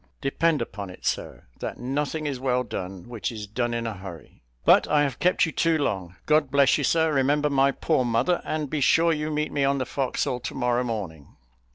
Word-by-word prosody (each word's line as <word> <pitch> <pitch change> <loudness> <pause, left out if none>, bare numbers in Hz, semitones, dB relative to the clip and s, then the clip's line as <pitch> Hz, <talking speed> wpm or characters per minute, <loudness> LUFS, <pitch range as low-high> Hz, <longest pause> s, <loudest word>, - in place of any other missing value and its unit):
Depend 150 0 +1
upon 100 -3 -7
it, 90 - -12
sir, - - -3
'that - - -5
nothing 145 +4 -2
is 140 -3 -2
well 125 -1 +1
done 95 -4 -6
which 120 -2 -4
is 110 -2 -6
done 120 +3 -2
in 115 0 -2
a 115 - -2
hurry.' 90 -4 -11 0.2
But - - +6
I 150 -1 +3
have 135 -5 -2
kept 180 0 +3
you 160 - -4
too 165 0 +2
long. 95 - -2
God 150 -2 +3
bless 140 +1 +4
you, - - -1
sir; 160 +2 +2
remember 145 +2 +2
my 135 0 +4
poor 130 - 0
mother, 120 +9 +1
and 155 -1 -2
be 150 +1 -2
sure 165 +4 +4
you 155 0 -2
meet 150 0 -1
me 140 - 0
on 140 0 +2
the 130 - -1
forecastle 130 -1 -2
to 125 - -6
morrow 125 -1 +1
morning." 95 - -6
135 Hz, 215 wpm, -25 LUFS, 115-150 Hz, 0.2 s, But